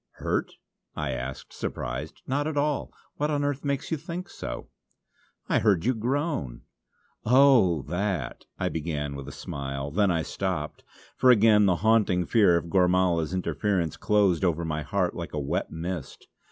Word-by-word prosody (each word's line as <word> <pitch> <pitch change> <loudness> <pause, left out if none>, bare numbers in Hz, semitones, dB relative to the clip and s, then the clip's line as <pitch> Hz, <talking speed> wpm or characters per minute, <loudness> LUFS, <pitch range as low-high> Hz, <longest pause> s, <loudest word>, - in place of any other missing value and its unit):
"Hurt?" - - -2 0.4
I 75 -3 -2
asked, 65 +1 -6
surprised 65 +6 -5
"not 145 +3 -1
at 155 -2 -3
all. 145 0 0 0.3
What 150 +1 0
on 145 -1 0
earth 145 -1 -1
makes 140 +1 -2
you 160 - +1
think 170 +4 -7
so?" - - -6 0.8
"I - - +2
heard 100 -5 +2
you 130 - +3
groan!" 125 - -2 0.6
"Oh 120 - +5
that 90 -2 -3
" - - -54
I - - 0
began 75 -3 -3
with 70 -1 -7
a - - -6
smile. 70 0 -5
Then 100 +4 +2
I 85 -3 +1
stopped, - - -3 0.3
for 130 - +4
again 105 -3 +6
the 90 - +3
haunting 105 -6 +3
fear 100 -4 +4
of 85 - -4
Gormala's 90 -3 +2
interference 95 -2 -1
closed 100 -5 +2
over 85 -2 +1
my 75 -1 -2
heart 90 +4 -1
like 85 -1 -6
a 75 - -1
wet 70 - -2
mist. 85 -1 -6
90 Hz, 165 wpm, -27 LUFS, 80-120 Hz, 0.8 s, again